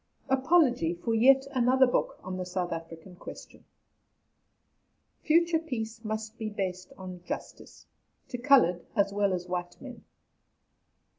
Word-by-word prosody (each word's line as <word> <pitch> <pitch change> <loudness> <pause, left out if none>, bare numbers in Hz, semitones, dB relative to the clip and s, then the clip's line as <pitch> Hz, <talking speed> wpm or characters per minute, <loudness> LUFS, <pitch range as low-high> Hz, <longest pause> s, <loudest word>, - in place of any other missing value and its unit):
APOLOGY 260 - +3
FOR 225 +7 -2
"YET 265 +4 +5
ANOTHER 260 +1 +4
BOOK" 245 - -1
ON 185 - -5
THE 185 - -3
SOUTH 180 -1 -2
AFRICAN 165 +2 -8
QUESTION. - - -11 1.6
FUTURE 335 +1 +3
PEACE 230 -7 -5
MUST 220 +1 -5
BE 220 -1 -3
BASED 185 -2 -4
ON 185 -1 -8
JUSTICE, - - -8 0.4
TO 245 - -5
COLOURED 240 -10 +4
AS 200 -2 +2
WELL 200 -1 +1
AS 180 -1 -3
WHITE 175 -1 -4
MEN. 260 -3 -10
215 Hz, 130 wpm, -29 LUFS, 180-260 Hz, 1.6 s, YET